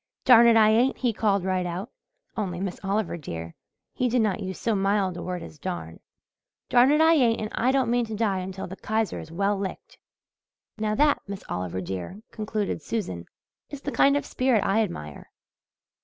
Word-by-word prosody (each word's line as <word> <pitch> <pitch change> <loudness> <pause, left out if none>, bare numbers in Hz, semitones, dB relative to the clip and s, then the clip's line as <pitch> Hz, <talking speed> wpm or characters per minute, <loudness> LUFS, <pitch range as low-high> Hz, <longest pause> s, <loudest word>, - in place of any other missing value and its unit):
'Darn 235 -2 +8
it, 230 -1 +6
I 215 -1 +6
ain't,' 240 +4 +3
he 245 -3 0
called 200 -3 +1
right 185 -1 0
out 180 +7 -5 0.4
only, 185 -5 -3
Miss 185 -1 -4
Oliver, 195 -2 -1
dear, 85 - -7 0.4
he 250 - 0
did 240 -1 +2
not 205 -4 0
use 190 -2 -5
so 230 - 0
mild 195 -2 +1
a - - -6
word 180 -2 -4
as 155 - -11
'darn' 140 - -5 0.7
'darn 250 +1 +5
it, 300 - +3
I 320 +1 +6
ain't, 245 -7 +3
and 215 0 -4
I 250 +3 +2
don't 265 -2 +2
mean 240 0 +2
to 220 - -5
die 205 -3 0
until 185 +1 -5
the 190 +2 -8
Kaiser 220 -1 -1
is 160 - -10
well 200 +3 0
licked.' 195 -1 -6 0.8
Now, 215 0 0
that, 295 +4 +3
Miss 200 -1 -6
Oliver, 90 0 -3
dear," 95 - -6
concluded 215 -5 -3
Susan, 95 - -4 0.4
"is 285 -2 -8
the 285 - -3
kind 280 +1 +4
of - - -3
spirit 255 -5 +1
I 205 +3 +3
admire." 75 - -5
205 Hz, 195 wpm, -26 LUFS, 180-230 Hz, 0.8 s, Darn